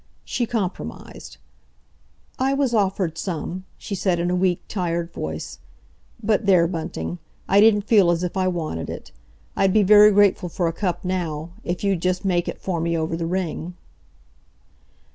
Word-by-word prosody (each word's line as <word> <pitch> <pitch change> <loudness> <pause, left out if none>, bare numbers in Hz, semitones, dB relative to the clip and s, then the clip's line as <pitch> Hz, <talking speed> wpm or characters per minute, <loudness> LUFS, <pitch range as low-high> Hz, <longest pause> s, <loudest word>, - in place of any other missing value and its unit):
She 240 -2 -1
compromised. 205 -6 -5 1.0
"I 270 +1 +2
was 275 -3 +1
offered 190 -6 0
some," 180 +1 -4
she - - -7
said, 185 -2 0
in 175 +1 0
a - - +1
weak, 180 -1 +1
tired 170 -3 -2
voice. 80 0 -5 0.6
"But 210 -1 +1
there, 180 -4 +5
Bunting, 160 - -4 0.3
I 200 +1 +5
didn't 210 -1 +5
feel 200 -4 +4
as 175 0 +1
if 180 - -3
I 185 -1 +1
wanted 160 - -3
it. - - -8 0.4
I'd 195 -1 +2
be 215 - +5
very 210 +2 +8
grateful 200 -3 +3
for 170 +1 -1
a 165 - -1
cup 180 0 -2
now—if 175 0 -4
you'd 195 -4 +1
just 185 +1 -1
make 175 -2 +1
it - - -4
for 175 -4 -2
me 170 0 0
over 160 +1 -1
the 165 0 -3
ring." 175 -1 -3
180 Hz, 160 wpm, -23 LUFS, 170-200 Hz, 1.0 s, very